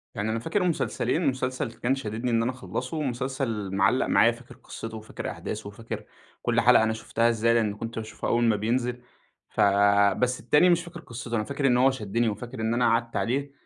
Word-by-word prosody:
يعني 105 Hz, +2 st, -2 dB
أنا 115 Hz, -, -1 dB
فاكر 170 Hz, -, -1 dB
مسلسلين، 170 Hz, -1 st, 0 dB
مسلسل 130 Hz, -3 st, -1 dB
كان 120 Hz, +3 st, -1 dB
شاددني 115 Hz, -1 st, -3 dB
إن 115 Hz, -1 st, +2 dB
أنا 125 Hz, -, 0 dB
اخلّصه 125 Hz, -, -5 dB
ومسلسل 130 Hz, -6 st, -2 dB
معلّق 100 Hz, +7 st, +3 dB
معايا، 115 Hz, -, +5 dB
فاكر 120 Hz, +2 st, -13 dB
قِصّته 115 Hz, -1 st, -8 dB
وفاكر 110 Hz, 0 st, -6 dB
أحداثه 105 Hz, -1 st, -6 dB
وفاكر 110 Hz, +3 st, -7 dB, 0.4 s
كلّ -, -, +2 dB
حلَقة -, -, +6 dB
أنا 110 Hz, 0 st, +1 dB
شُفتها 115 Hz, +1 st, 0 dB
إزاي، 115 Hz, 0 st, +2 dB
لإني 110 Hz, -3 st, +2 dB
كنت 115 Hz, +2 st, -6 dB
باشوفها 110 Hz, 0 st, -5 dB
أول 120 Hz, 0 st, +2 dB
ما 115 Hz, -2 st, +3 dB
بينزِل، 120 Hz, +3 st, -1 dB, 0.5 s
ف -, -, -11 dB, 0.6 s
بس 125 Hz, 0 st, +1 dB
التاني 150 Hz, +9 st, +4 dB
مش 170 Hz, -1 st, +3 dB
فاكر 175 Hz, 0 st, -10 dB
قِصّته، 120 Hz, -3 st, -6 dB
أنا 110 Hz, -, 0 dB
فاكر 140 Hz, +2 st, -1 dB
إنه 125 Hz, +1 st, +4 dB
هو 135 Hz, -, +6 dB
شدّني 115 Hz, -1 st, -1 dB
وفاكر 120 Hz, +3 st, -6 dB
إن 110 Hz, +1 st, 0 dB
أنا 120 Hz, 0 st, +2 dB
قعَدت 115 Hz, 0 st, 0 dB
عليه، 140 Hz, +4 st, -1 dB
120 Hz, 200 wpm, -26 LUFS, 110-130 Hz, 0.6 s, حلَقة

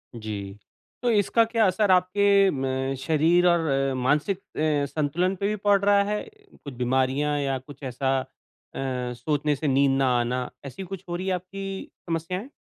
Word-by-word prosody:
जी। 105 Hz, -3 st, -6 dB, 0.5 s
तो 245 Hz, -, +2 dB
इसका 215 Hz, +2 st, +3 dB
क्या 230 Hz, -2 st, +3 dB
असर 195 Hz, +2 st, +2 dB
आपके 195 Hz, +2 st, +4 dB
म 135 Hz, 0 st, -2 dB
शरीर 165 Hz, +5 st, +3 dB
और 170 Hz, -2 st, +3 dB
अ, 135 Hz, -1 st, +1 dB
मानसिक 145 Hz, +9 st, +1 dB
अ, 150 Hz, -5 st, -1 dB
संतुलन 160 Hz, +6 st, 0 dB
पे 195 Hz, +2 st, -1 dB
भी 210 Hz, -, 0 dB
पड़ 205 Hz, -1 st, +3 dB
रहा 200 Hz, 0 st, +5 dB
है? 210 Hz, +1 st, -2 dB, 0.4 s
कुछ 140 Hz, -, -7 dB
बीमारियाँ 130 Hz, +4 st, 0 dB
या 135 Hz, -2 st, 0 dB
कुछ 140 Hz, +2 st, -14 dB
ऐसा 135 Hz, +1 st, 0 dB
अ, -, -, -5 dB, 0.5 s
सोचने 135 Hz, +3 st, -1 dB
से 150 Hz, +2 st, -3 dB
नींद 135 Hz, 0 st, +3 dB
ना 135 Hz, -1 st, +2 dB
आना, 125 Hz, +1 st, -1 dB, 0.2 s
ऐसी 140 Hz, +8 st, -7 dB
कुछ 190 Hz, 0 st, -7 dB
हो 175 Hz, -, -2 dB
रही 185 Hz, +2 st, -4 dB
है, 190 Hz, -, +1 dB
आपकी 195 Hz, +2 st, -6 dB, 0.2 s
समस्याएँ? 180 Hz, -, -3 dB
150 Hz, 170 wpm, -25 LUFS, 135-190 Hz, 0.5 s, रहा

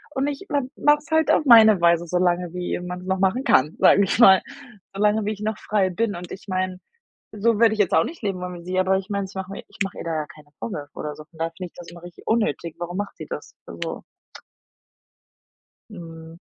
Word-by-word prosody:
Und 265 Hz, +1 st, 0 dB
ich 290 Hz, +6 st, -5 dB
ma 285 Hz, -, +1 dB
mache 295 Hz, 0 st, +4 dB
es 295 Hz, -, -19 dB
halt 320 Hz, 0 st, +3 dB
auf 310 Hz, -, +2 dB
meine 220 Hz, -5 st, +8 dB
Weise, 170 Hz, 0 st, +3 dB
so 180 Hz, -, 0 dB
lange, 175 Hz, -1 st, 0 dB
wie 180 Hz, 0 st, -3 dB
man 180 Hz, 0 st, -6 dB
es -, -, -11 dB
noch 190 Hz, 0 st, 0 dB
machen 195 Hz, +7 st, +1 dB
kann, 150 Hz, -, +3 dB
sage 200 Hz, -, +6 dB
ich 195 Hz, -, 0 dB
mal, 190 Hz, -6 st, +8 dB, 0.5 s
so 195 Hz, -, -5 dB
lange 210 Hz, +1 st, +3 dB
wie 210 Hz, -, 0 dB
ich 210 Hz, -, -12 dB
noch 215 Hz, 0 st, -2 dB
frei 205 Hz, -3 st, 0 dB
bin 210 Hz, +3 st, -1 dB
und 175 Hz, 0 st, -8 dB
ich 195 Hz, -, -9 dB
meine, 185 Hz, -1 st, -2 dB, 0.5 s
so 215 Hz, +1 st, +1 dB
würde 225 Hz, -2 st, +5 dB
ich 215 Hz, -, -6 dB
jetzt 200 Hz, -4 st, +2 dB
auch 160 Hz, -, +5 dB
nicht 330 Hz, -5 st, -9 dB
leben 195 Hz, -3 st, -2 dB
wollen 180 Hz, 0 st, -5 dB
wie 170 Hz, -, -10 dB
sie, 185 Hz, +1 st, -1 dB
aber 190 Hz, +1 st, +2 dB
ich 190 Hz, +1 st, -6 dB
meine, 200 Hz, -1 st, -2 dB
ich 190 Hz, -, -15 dB
mache 190 Hz, 0 st, -5 dB
mir 195 Hz, -, -7 dB
ich -, -, -18 dB
mache 195 Hz, -, -6 dB
ihr -, -, -5 dB
da 165 Hz, -, -2 dB
ja 155 Hz, -1 st, -2 dB
keine 150 Hz, 0 st, -16 dB
Vorwürfe 150 Hz, -10 st, -6 dB
oder 150 Hz, -1 st, -5 dB
so. 155 Hz, -, -11 dB
Von 165 Hz, 0 st, -22 dB
daher 165 Hz, 0 st, -1 dB
finde 185 Hz, -, -5 dB
ich -, -, -48 dB
das 175 Hz, -1 st, -11 dB
immer 170 Hz, 0 st, -12 dB
richtig 175 Hz, 0 st, -13 dB
unnötig. 220 Hz, -7 st, 0 dB
Warum 175 Hz, +1 st, -5 dB
macht 205 Hz, 0 st, -4 dB
sie -, -, -8 dB
das? -, -, -7 dB
Also -, -, -6 dB, 1.9 s
Mhm. 165 Hz, -4 st, -11 dB
185 Hz, 250 wpm, -23 LUFS, 175-215 Hz, 1.9 s, meine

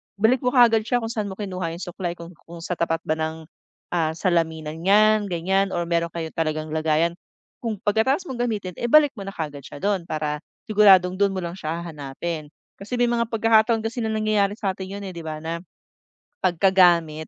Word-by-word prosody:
Balik 220 Hz, +6 st, +3 dB
mo 250 Hz, 0 st, -1 dB
kaagad 230 Hz, -2 st, +6 dB
siya 245 Hz, -1 st, +1 dB
kung 225 Hz, -, -3 dB
saan 215 Hz, -3 st, -2 dB
mo 190 Hz, -, -6 dB
kinuha 185 Hz, -5 st, -4 dB
yung 175 Hz, -, -7 dB
suklay 175 Hz, -1 st, -4 dB
kung, 170 Hz, 0 st, -10 dB, 0.2 s
kung 170 Hz, 0 st, -10 dB
sa 180 Hz, 0 st, -3 dB
tapat 165 Hz, 0 st, 0 dB
ba 155 Hz, 0 st, -1 dB
ng, 160 Hz, 0 st, -3 dB, 0.5 s
ah, 160 Hz, -2 st, 0 dB
salaminan 160 Hz, -3 st, -1 dB
yan 215 Hz, +1 st, +4 dB
ganyan 190 Hz, +2 st, 0 dB
or 175 Hz, -, 0 dB
mayro'n 170 Hz, 0 st, +1 dB
kayong 160 Hz, -2 st, -4 dB
talagang 155 Hz, -1 st, -1 dB
lagayan. 160 Hz, +1 st, +1 dB, 0.5 s
Kung 230 Hz, -3 st, -3 dB
pagkatapos 225 Hz, -, +2 dB
mong 245 Hz, -1 st, -1 dB
gamitin, 205 Hz, -5 st, -3 dB
eh, -, -, -2 dB
balik 295 Hz, +2 st, +6 dB
mo 195 Hz, -, -6 dB
na 195 Hz, -, -5 dB
kaagad 150 Hz, -3 st, -5 dB
siya 145 Hz, -, -10 dB
do'n 195 Hz, -4 st, 0 dB
para 150 Hz, -1 st, -2 dB, 0.3 s
siguradong 190 Hz, -3 st, +5 dB
do'n 200 Hz, -1 st, +3 dB
mo 185 Hz, -, -2 dB
lang 170 Hz, -, -4 dB
siya 165 Hz, -1 st, -4 dB
hahanapin. 155 Hz, 0 st, -5 dB, 0.3 s
Kasi 210 Hz, +5 st, -5 dB
may 245 Hz, -, +4 dB
mga 235 Hz, 0 st, +1 dB
pagkakataon 225 Hz, 0 st, +3 dB
kasi 225 Hz, +2 st, -3 dB
nalangyayari 215 Hz, -2 st, +1 dB
sa 195 Hz, -3 st, 0 dB
atin 190 Hz, 0 st, -7 dB
'yun, -, -, -8 dB
eh, 185 Hz, -, -6 dB
'di 170 Hz, -, -7 dB
ba, 155 Hz, -1 st, -5 dB
na 165 Hz, +1 st, -3 dB, 0.8 s
pagkagamit, 175 Hz, -4 st, +3 dB
180 Hz, 200 wpm, -23 LUFS, 165-215 Hz, 0.8 s, kaagad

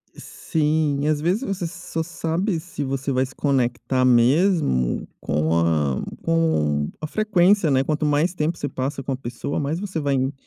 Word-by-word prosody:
Sim, 150 Hz, -2 st, -1 dB
e -, -, +1 dB
às 155 Hz, -1 st, +1 dB
vezes 185 Hz, -, 0 dB
você 195 Hz, -6 st, -2 dB
só 165 Hz, -1 st, -5 dB
sabe 165 Hz, +3 st, -2 dB
se 160 Hz, -3 st, -6 dB
você 135 Hz, 0 st, -2 dB
vai 130 Hz, 0 st, +2 dB
se 130 Hz, -, -13 dB
conectar 130 Hz, -2 st, 0 dB
mesmo 125 Hz, -, +3 dB
com 80 Hz, +2 st, 0 dB
a 75 Hz, -5 st, +1 dB, 0.2 s
com 75 Hz, -, +1 dB
a 155 Hz, -, -4 dB
frequência, 200 Hz, -2 st, +3 dB
né. 135 Hz, -1 st, +3 dB
Quanto 155 Hz, +2 st, -1 dB
mais 150 Hz, +4 st, +2 dB
tempo 165 Hz, 0 st, -1 dB
você 145 Hz, -, -3 dB
passa 135 Hz, +1 st, -4 dB
com 135 Hz, -, -3 dB
a -, -, 0 dB
pessoa, 125 Hz, +2 st, -4 dB
mais 150 Hz, +4 st, -2 dB
você 190 Hz, -4 st, -4 dB
vai 140 Hz, -2 st, 0 dB
en 135 Hz, +1 st, 0 dB
145 Hz, 180 wpm, -23 LUFS, 130-165 Hz, 0.2 s, mesmo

